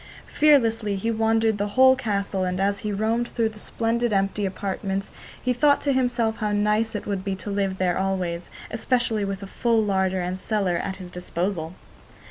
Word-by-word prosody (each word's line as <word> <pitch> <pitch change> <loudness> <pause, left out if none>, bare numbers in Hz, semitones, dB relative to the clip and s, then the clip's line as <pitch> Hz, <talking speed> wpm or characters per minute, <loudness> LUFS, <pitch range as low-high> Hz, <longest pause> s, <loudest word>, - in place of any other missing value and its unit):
Fearlessly 230 -8 +3
he 225 +4 -1
wandered 225 -1 +2
the 205 - 0
whole 260 0 +7
castle, 200 -6 -1
and 180 0 -1
as 200 +1 +1
he 210 - -3
roamed 220 +4 0
through 230 -2 0
the 215 -1 -12
splendid 230 +2 -1
empty 195 0 +1
apartments 195 +1 -3 0.3
he 250 - 0
thought 285 +3 +4
to 280 - +1
himself 245 -3 +1
how 210 -2 -1
nice 210 +2 +1
it 210 - -4
would 200 -2 -2
be 195 -1 -2
to 200 +2 -6
live 195 -1 -1
there 185 -1 +1
always, 180 -3 -2 0.2
especially 225 -2 0
with 195 0 -3
a - - -5
full 230 +3 +1
larder 190 -2 +1
and 180 +1 -3
cellar 195 -4 0
at 190 - -3
his 185 -2 -10
disposal. 180 -1 -3
205 Hz, 185 wpm, -24 LUFS, 190-225 Hz, 0.3 s, whole